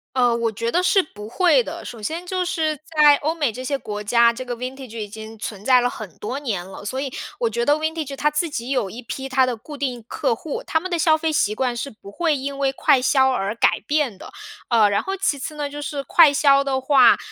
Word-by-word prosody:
呃， 245 -2 +3
我 235 -1 0
觉 230 +2 -3
得 355 - +2
是 375 +1 +3
不 210 -9 -11
会 365 - +3
的。 - - -7
首 230 - -9
先 325 +11 -4
就 365 0 -2
是 315 -3 -1
在 300 -3 +5
欧 315 +3 -2
美 290 -7 0
这 250 +4 -8
些 280 +2 -1
国 210 -5 -6
家， 235 +3 +4
这 255 +2 -7
个 245 -1 -4
Vintage 255 -1 -7
已 210 -2 -5
经 220 +1 -9
存 210 -2 -7
在 255 -1 +5
了 245 - +1
很 210 -9 -9
多 255 +6 -4
年 210 -11 -3
了， 195 +2 -10
所 260 +5 -3
以， 275 -2 -4 0.2
我 470 -2 0
觉 235 - -1
得 290 - +4
Vintage 310 -2 -3
它 300 +2 +1
自 310 +2 -1
己 240 -3 -5
有 250 -7 0
一 235 +6 -8
批 265 +3 -6
它 260 0 +3
的 250 -2 -3
固 295 +7 -10
定 260 -4 -3
客 - - 0
户。 290 +6 -5
他 320 - +1
们 370 +3 -6
的 345 - 0
消 315 -1 +4
费 315 -1 -1
习 210 -7 +2
惯 245 +2 -1
是 250 +4 -4
不 205 -2 -14
会 315 +4 0
因 275 +1 -5
为 270 -1 +2
快 265 -1 +3
销 265 0 +3
而 205 -5 -1
改 230 - +2
变 290 -8 -1
的。 - - -11 0.4
呃， 225 -4 +5
然 200 - 0
后 390 0 -3
其 305 -7 0
次 305 +3 -6
呢， 295 -1 -3
就 290 +1 -7
是 290 -1 -4
快 310 -1 +6
销 275 -1 +4
的 270 -1 -1
话， 265 -1 +5
265 Hz, 315 characters per minute, -22 LUFS, 235-300 Hz, 0.4 s, 快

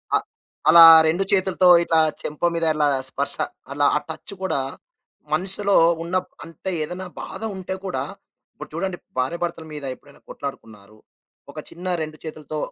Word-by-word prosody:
ఆ! - - +6 0.5
అలా 170 0 +10 0.2
2 175 +5 +1
చేతులతో 190 -1 +3 0.2
ఇట్లా 165 -1 +2 0.2
చెంప 150 +3 -1
మీద 165 0 0
ఇలా 150 -1 +2 0.2
స్పర్శ, 140 +2 -2 0.4
అలా 145 0 +1
ఆ - - 0
టచ్ 160 +5 -7
గూడా, 190 -7 0 0.7
మనసులో 195 +4 +1 0.3
ఉన్న 175 +2 -4 0.3
అంటే 165 +3 -6
ఏదైనా 180 +4 -6
బాధ - - -8
ఉంటే 190 0 -5
కూడా, 185 - -2 0.5
ఇప్పుడు - - -10
చూడండి 190 -2 -3 0.2
భార్యాభర్తల 170 +4 -2
మీద 150 - -7
ఎప్పుడైనా 145 +2 -21
కొట్లాడుకున్నారు. 110 -7 -9 0.5
ఒక - - -8
చిన్న 180 +2 -9
2 155 0 -6
చేతులతో 155 -1 -7
165 Hz, 140 wpm, -22 LUFS, 150-185 Hz, 0.7 s, అలా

